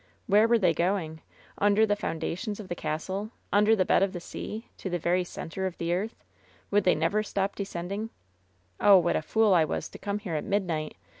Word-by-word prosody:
Where 210 +1 +5
were 235 0 +4
they 185 -6 +3
going? 170 -2 -1 0.4
Under 205 +2 +4
the 205 -1 +1
foundations 205 +4 -3
of 205 - -8
the - - -1
castle? 185 +7 -3 0.2
Under 210 +2 +5
the 185 -3 +2
bed - - +3
of 195 -1 +1
the 175 - -4
sea? 215 +6 -7
To 190 - -5
the 175 - 0
very 175 +2 +1
center 180 +2 -4
of 180 - -7
the 170 0 -1
earth? 205 +6 -3 0.5
Would 205 -1 +3
they 180 - +5
never 165 +7 +1
stop 200 -1 -2
descend 180 -3 -5
ing? 215 +3 -3 0.7
"Oh, 200 -2 +7
what 175 -1 +2
a - - +1
fool 215 +5 +3
I 170 -3 +5
was 155 - -3
to - - -11
come 200 0 -2
here 205 -5 -5
at 155 - -1
midnight. 170 -7 -1
190 Hz, 215 wpm, -28 LUFS, 170-205 Hz, 0.7 s, Oh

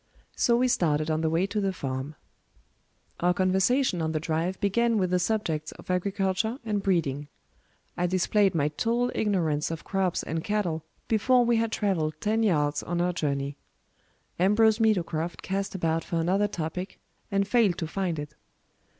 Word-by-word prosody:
So 235 - +3
we 255 +1 +3
started 155 -8 +1
on 155 0 0
the 160 - +1
way 165 +4 +2
to 205 +1 -2
the 195 -1 +1
farm. 135 -3 -4 1.0
Our 180 +1 +2
conversation 190 +3 +2
on 160 0 -1
the 155 - 0
drive 165 +4 -2
began 230 +3 +2
with 185 -3 0
the 180 - +3
subjects 170 -6 -1
of - - -7
agriculture 195 +4 0
and 210 -2 -1
breeding. 150 -7 0 0.7
I 180 - 0
displayed 185 +1 +2
my 150 -2 +2
total 235 +10 0
ignorance 165 -8 0
of 165 -1 -5
crops 190 -2 -1
and 160 0 -3
cattle 180 -7 -1 0.2
before 240 +3 +3
we 235 -1 +3
had 225 0 0
traveled 165 -9 0
ten 220 +2 +1
yards 150 -8 +1
on 175 0 -3
our 180 +1 +1
journey. 140 -3 -2 0.8
Ambrose 215 +4 +4
Meadowcroft 175 -6 0
cast 195 +1 -2
about 165 -2 0
for - - -5
another 185 +5 +2
topic, 180 +1 -5 0.3
and 195 0 +1
failed 205 -5 +3
to 165 - -2
find 175 0 -2
it. 150 0 -6
185 Hz, 165 wpm, -27 LUFS, 160-210 Hz, 1.0 s, Ambrose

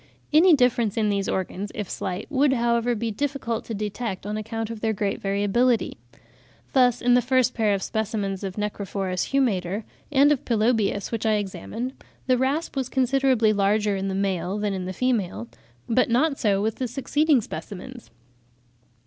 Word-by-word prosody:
Any 330 +2 +7
difference 240 -5 +2
in 215 -2 +2
these 200 -1 0
organs, 190 +2 -3
if 210 -3 -3
slight, 185 +2 -4
would, 275 -1 +3
however, 235 0 +1
be 230 +1 -2
difficult 255 -1 -2
to 225 - -4
detect, 205 -1 -4
on 210 +1 -3
account 225 +1 -4
of 225 -2 -7
their 220 -1 +1
great 200 -1 -2
variability. 205 +5 +1 0.8
Thus, 250 -2 +3
in 245 0 +4
the 250 - +5
first 255 0 +2
pair 215 -3 +2
of 195 - -4
specimens 205 -3 -2
of 190 -1 -4
Necrophorus 195 -3 -2
humator 210 -7 0 0.3
and 285 +1 +5
of 285 - +1
Pelobius 220 -3 +1
which 225 -1 -1
I 220 - +3
examined, 205 - -3 0.3
the 255 - +3
rasp 280 +6 -1
was 265 -2 -2
considerably 260 -4 +2
larger 205 +1 +2
in 195 0 -2
the 190 - -2
male 190 -1 -1
than 210 -1 -1
in 185 -1 -3
the 185 - -3
female; 190 - -1 0.4
but 245 +2 +2
not 275 +5 +2
so 200 -2 +2
with 225 +3 -2
succeeding 290 +3 +2
specimens. 230 - -8
220 Hz, 165 wpm, -24 LUFS, 200-250 Hz, 0.8 s, Any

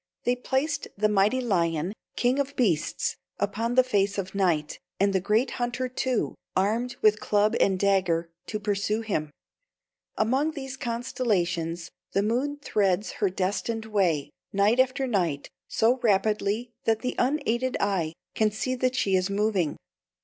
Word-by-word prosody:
They 245 - +2
placed 280 +4 -1
the 215 +1 +3
mighty 210 +5 +3
lion, 170 -5 0 0.2
king 250 +3 +2
of 280 0 -2
beasts, 185 - 0 0.2
upon 225 +4 -1
the 255 - +7
face 200 -5 +1
of 190 -1 -3
night, 175 -6 0 0.2
and 200 +1 +3
the 190 - +3
great 220 +7 +2
hunter, 245 +1 -1
too, 255 -1 -1 0.2
armed 225 +6 +1
with 215 0 +5
club 210 +1 +2
and 190 -1 +3
dagger, 180 -4 +2 0.2
to 215 - -3
pursue 210 +1 0
him. 175 -9 -2 0.9
Among 265 +8 +1
these 270 -3 -6
constellations 180 -9 -1 0.2
the 195 - +2
moon 255 +7 0
threads 200 -1 +1
her 200 - +4
destined 205 +4 -2
way, 185 -9 +1 0.2
night 205 +5 +3
after 260 +1 +2
night, 175 - -1 0.2
so 235 +3 +2
rapidly 215 +1 +1
that 225 -1 +2
the 255 - -1
unaided 255 -2 +1
eye 180 -6 0 0.2
can 215 -1 +2
see 215 +5 -2
that 255 0 0
she 195 -6 +2
is 185 +1 +1
moving. 200 -5 0
215 Hz, 150 wpm, -27 LUFS, 190-245 Hz, 0.9 s, the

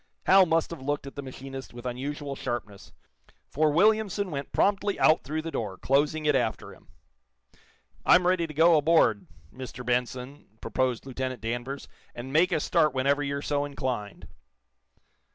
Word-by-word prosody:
Hal 190 -1 +6
must 165 0 +1
have 165 - -7
looked 145 +1 -2
at 140 - -8
the 140 - -5
machinist 135 -1 -9
with 120 +1 -10
unusual 140 +3 -4
sharpness, 110 -6 -6 0.6
for 155 +2 +2
Williamson 200 +3 +2
went 140 -1 -5
promptly 205 0 +1
out 155 - +4
through 155 +2 -3
the 165 - -5
door, 100 -8 -4
closing 150 +3 +1
it 150 - +4
after 120 -4 -2
him. - - -20 1.2
"I'm 180 - +5
ready 180 -2 +2
to 155 - -9
go 165 +2 +6
aboard, 150 -9 +3 0.3
Mr. 125 -1 -8
Benson," 125 0 -3
proposed 125 +3 -1
Lieutenant 130 -1 -4
Danvers, 120 +4 -4 0.3
"and 130 +3 -7
make 175 +4 +4
a 165 - +1
start 155 -2 +2
whenever 140 +2 +2
you're 140 0 -3
so 145 -1 0
inclined." 130 -7 -4
140 Hz, 155 wpm, -27 LUFS, 125-155 Hz, 1.2 s, Hal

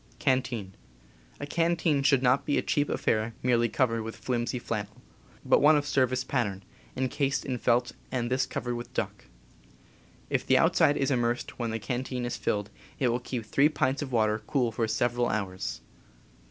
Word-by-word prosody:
A 120 - -4
canteen 165 -2 +1
should 135 -2 +3
not 125 +2 +3
be 145 - 0
a - - +1
cheap 145 0 0
affair 110 +1 0
merely 120 -2 +3
covered 115 -4 +1
with 110 0 -6
flimsy 125 0 -2
flannel, 105 -3 -5 0.5
but - - +4
one 150 +1 +6
of 145 - -1
service 130 -3 +1
pattern, 105 -8 -2 0.3
incased 135 +2 0
p - - -7
in 125 - -2
felt 120 +1 +2 0.2
and 120 -1 -2
this 130 0 +1
covered 120 -1 -3
with 120 0 -7
duck. - - -3 1.0
If - - 0
the - - +4
outside 145 - +4
is 135 0 +1
immersed 120 -1 -1
when 120 -1 -1
the 110 - -2
can 120 +4 -3
teen 125 -2 -4
is 120 - -3
filled 105 0 -2 0.3
it 130 - +2
will 120 +1 0
keep 120 -2 -5
three 140 +7 +3
pints 140 -2 0
of 140 -3 -5
water 110 -2 +2
cool 125 -5 +1
for 115 +1 -1
several 120 +2 +1
hours. 95 - -3
125 Hz, 180 wpm, -28 LUFS, 115-135 Hz, 1.0 s, one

